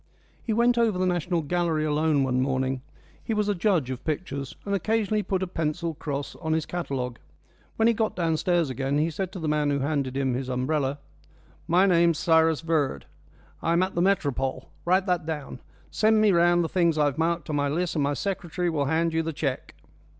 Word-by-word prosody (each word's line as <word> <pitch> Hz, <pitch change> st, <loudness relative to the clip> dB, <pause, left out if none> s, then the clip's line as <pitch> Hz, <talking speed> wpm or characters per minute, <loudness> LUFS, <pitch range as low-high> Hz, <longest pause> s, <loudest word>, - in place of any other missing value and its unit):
He 230 Hz, -, -3 dB
went 235 Hz, +2 st, +3 dB
over 225 Hz, -5 st, +2 dB
the 185 Hz, -, +1 dB
National 175 Hz, -1 st, 0 dB
Gallery 165 Hz, -1 st, 0 dB
alone 150 Hz, -1 st, +2 dB
one 130 Hz, -1 st, +1 dB
morning; 130 Hz, 0 st, -1 dB, 0.4 s
he 225 Hz, -, -2 dB
was 210 Hz, -1 st, +1 dB
a 205 Hz, -, +2 dB
judge 175 Hz, -, +1 dB
of 130 Hz, 0 st, -6 dB
pictures, 140 Hz, -4 st, -4 dB
and 200 Hz, -, -2 dB
occasionally 215 Hz, +1 st, +1 dB
he -, -, -2 dB
put 190 Hz, -1 st, -1 dB
a -, -, -2 dB
pencil 165 Hz, 0 st, -2 dB
cross 145 Hz, -2 st, -5 dB
on 160 Hz, -2 st, -2 dB
his 160 Hz, -1 st, 0 dB
catalogue. 130 Hz, -8 st, -4 dB, 0.6 s
When 225 Hz, -, +3 dB
he 235 Hz, -, +4 dB
got 220 Hz, 0 st, -1 dB
downstairs 170 Hz, -2 st, +1 dB
again 135 Hz, +3 st, -1 dB
he 160 Hz, +3 st, +1 dB
said 185 Hz, +3 st, -4 dB
to -, -, -6 dB
the 160 Hz, -, -3 dB
man 150 Hz, -1 st, +1 dB
who 140 Hz, -, +1 dB
handed 140 Hz, -2 st, -1 dB
him 135 Hz, -2 st, 0 dB
his 130 Hz, +1 st, -3 dB
umbrella: 135 Hz, +2 st, -1 dB, 0.7 s
"My 180 Hz, +3 st, +4 dB
name's 170 Hz, -3 st, +4 dB
Cyrus 160 Hz, -2 st, +3 dB
Verd, 160 Hz, -4 st, 0 dB, 0.6 s
and -, -, -1 dB
I'm 170 Hz, +2 st, +3 dB
at 190 Hz, -, -2 dB
the 170 Hz, -, 0 dB
Métropole. 145 Hz, -9 st, 0 dB, 0.2 s
Write 185 Hz, +2 st, +3 dB
that 180 Hz, -4 st, 0 dB
down. 150 Hz, -5 st, -5 dB, 0.3 s
Send 220 Hz, 0 st, +3 dB
me 215 Hz, -1 st, +5 dB
round 175 Hz, 0 st, +4 dB
the -, -, -1 dB
things 170 Hz, -2 st, +1 dB
I've 145 Hz, 0 st, +1 dB
marked 165 Hz, -1 st, 0 dB
on -, -, -1 dB
my 145 Hz, 0 st, +1 dB
list 175 Hz, +4 st, -1 dB
and 150 Hz, -, +1 dB
my 140 Hz, +1 st, 0 dB
secretary 180 Hz, -2 st, -2 dB
will 145 Hz, -3 st, 0 dB
hand 160 Hz, +3 st, +1 dB
you 165 Hz, -, +2 dB
the 165 Hz, 0 st, -3 dB
cheque." 140 Hz, -4 st, -3 dB
160 Hz, 210 wpm, -26 LUFS, 145-180 Hz, 0.7 s, me